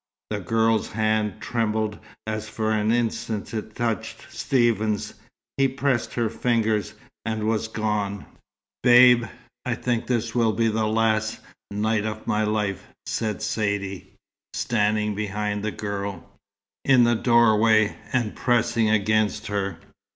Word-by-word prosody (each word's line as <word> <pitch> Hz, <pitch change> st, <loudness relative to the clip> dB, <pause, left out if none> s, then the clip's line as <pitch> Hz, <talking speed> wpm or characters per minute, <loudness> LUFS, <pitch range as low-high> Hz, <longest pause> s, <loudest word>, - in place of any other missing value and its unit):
The 105 Hz, -, -1 dB
girl's 110 Hz, +3 st, +1 dB
hand 110 Hz, -1 st, 0 dB
trembled 110 Hz, -2 st, -1 dB, 0.3 s
as 110 Hz, 0 st, -4 dB
for 110 Hz, 0 st, -1 dB
an 110 Hz, 0 st, +1 dB
instant 115 Hz, -3 st, -1 dB
it 110 Hz, -1 st, -5 dB
touched 115 Hz, -4 st, -3 dB
Stephen's. 110 Hz, -5 st, +1 dB, 0.4 s
He 135 Hz, 0 st, +4 dB
pressed 135 Hz, -2 st, -1 dB
her 120 Hz, -2 st, +1 dB
fingers, 110 Hz, -2 st, 0 dB, 0.3 s
and 110 Hz, -1 st, -2 dB
was 110 Hz, 0 st, 0 dB
gone. 105 Hz, -2 st, -2 dB, 0.6 s
"Babe, 125 Hz, -1 st, +7 dB, 0.4 s
I -, -, -1 dB
think 120 Hz, -2 st, -2 dB
this 120 Hz, -2 st, -1 dB
will 115 Hz, -3 st, +2 dB
be 115 Hz, +2 st, +2 dB
the 110 Hz, 0 st, 0 dB
last 110 Hz, 0 st, +1 dB, 0.3 s
night 105 Hz, +1 st, 0 dB
of 110 Hz, 0 st, -6 dB
my 110 Hz, -1 st, +1 dB
life," 105 Hz, -3 st, -1 dB, 0.2 s
said 110 Hz, -3 st, -2 dB
Saidee, 100 Hz, -3 st, -2 dB, 0.5 s
standing 105 Hz, -1 st, +1 dB
behind 105 Hz, 0 st, -2 dB
the 110 Hz, -, 0 dB
girl, 100 Hz, -4 st, -5 dB, 0.6 s
in 130 Hz, -3 st, +5 dB
the 120 Hz, 0 st, +4 dB
doorway, 110 Hz, -2 st, +4 dB, 0.2 s
and 120 Hz, -4 st, 0 dB
pressing 120 Hz, -2 st, +2 dB
against 110 Hz, 0 st, +1 dB
her. 100 Hz, -3 st, -2 dB
110 Hz, 130 wpm, -24 LUFS, 105-115 Hz, 0.6 s, Babe